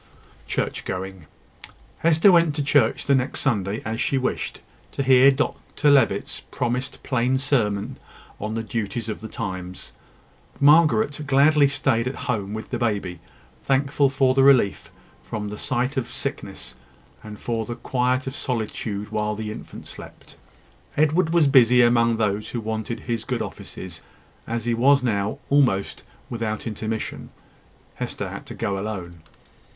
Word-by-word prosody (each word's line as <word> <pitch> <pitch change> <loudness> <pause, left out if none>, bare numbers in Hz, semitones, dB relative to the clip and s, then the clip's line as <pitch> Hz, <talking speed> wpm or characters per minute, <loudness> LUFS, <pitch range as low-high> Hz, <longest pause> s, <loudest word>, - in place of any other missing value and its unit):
CHURCH - - -2
GOING. 95 -3 -6 0.7
Hester 165 +4 +5
went 170 -4 +4
to 145 - -1
church 145 0 +2
the 140 - +3
next 130 0 0
Sunday, 105 -5 -1
as 110 +1 -2
she 135 - +1
wished, 130 - -2 0.3
to 140 - -1
hear 130 0 +7
Dr 145 +2 0
Levitt's 130 -8 +2
promised 125 +2 -3
plain 130 0 +1
sermon 120 -3 0 0.4
on 105 +2 -4
the 115 - -2
duties 115 +1 -3
of 105 - -4
the 110 - -7
times. 95 - -6 0.7
Margaret 145 -2 +4
gladly 145 +1 +5
staid 115 -4 0
at 130 - -3
home 105 -4 -2
with 110 - -7
the - - -2
baby, 100 -7 -1 0.4
thankful 140 +1 +2
for 135 -1 +2
the 135 - +3
relief 130 -8 +4 0.3
from 105 -2 -5
the 105 - -6
sight 130 +3 -1
of 130 - -2
sickness, 65 - -5 0.5
and 105 -1 -9
for 115 -2 -3
the 120 - -4
quiet 125 +1 0
of 135 +1 -5
solitude 110 -4 -3
while 105 0 -1
the 110 0 -4
infant - - -10
slept. - - -12 0.6
Edward 155 +3 +3
was 170 -2 +4
busy 125 -3 +6
among 115 -1 +3
those 105 -1 -1
who 120 - -3
wanted 110 +1 -4
his 115 -2 -3
good 125 0 -2
offices, 90 -3 -9 0.5
as 115 -1 -3
he 120 - +1
now - - -2
was, 120 -7 +3
almost 125 -9 +2 0.3
without 115 -2 -3
intermission. 110 0 -4 0.6
Hester - - -5
had - - -8
to - - -8
go 100 -1 -2
alone. 95 -5 -5
120 Hz, 150 wpm, -23 LUFS, 105-135 Hz, 0.7 s, hear